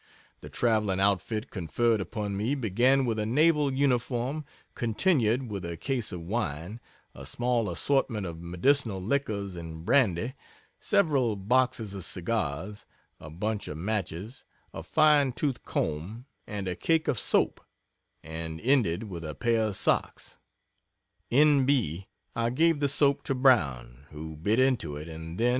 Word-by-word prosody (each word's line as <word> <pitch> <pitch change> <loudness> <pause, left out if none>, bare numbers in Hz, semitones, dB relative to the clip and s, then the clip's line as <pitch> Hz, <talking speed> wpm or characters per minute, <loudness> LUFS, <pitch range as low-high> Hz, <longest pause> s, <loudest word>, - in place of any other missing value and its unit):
The - - -10
traveling 105 -5 +1
outfit 100 +3 0
conferred 110 +5 0
upon 100 +2 -4
me 110 +8 0
began 130 +3 +2
with 115 -2 -1
a 105 - -1
naval 150 +3 +3
uniform, 130 +1 0 0.3
continued 120 - +1
with 100 -2 -4
a 85 -1 -5
case 125 - -2
of 90 - -6
wine, 90 0 -3 0.3
a - - -11
small 120 -3 -1
assortment 115 +2 0
of 85 -2 -7
medicinal 100 +5 +1
liquors 100 -4 -2
and 80 -1 -8
brandy, 115 -2 +2 0.5
several 145 - +2
boxes 115 0 0
of 100 -2 -6
cigars, 95 +1 -3 0.3
a 75 - -10
bunch 105 +6 -3
of 75 - -6
matches, 100 +3 -4 0.3
a - - -6
fine 150 -4 +4
toothed 135 -1 -2
comb, 90 +11 -3 0.2
and 100 -2 -4
a 90 - -1
cake 160 - +1
of 120 - +1
soap, - - +1 0.6
and 80 0 -6
ended 115 -9 +2
with 90 -6 -7
a 75 -2 -6
pair 115 +4 +1
of 105 - -4
socks. - - -1 0.9
(N. 145 +1 +5
B. 100 - 0 0.3
I 115 0 +1
gave 160 +5 +2
the 145 -1 +1
soap 140 0 +3
to 135 - -1
Brown, 70 - +2
who 80 +1 -8
bit 100 +9 0
into 130 - +1
it, 75 +2 -7
and 80 +1 -8
then. 120 +2 +2
110 Hz, 150 wpm, -28 LUFS, 90-130 Hz, 0.9 s, N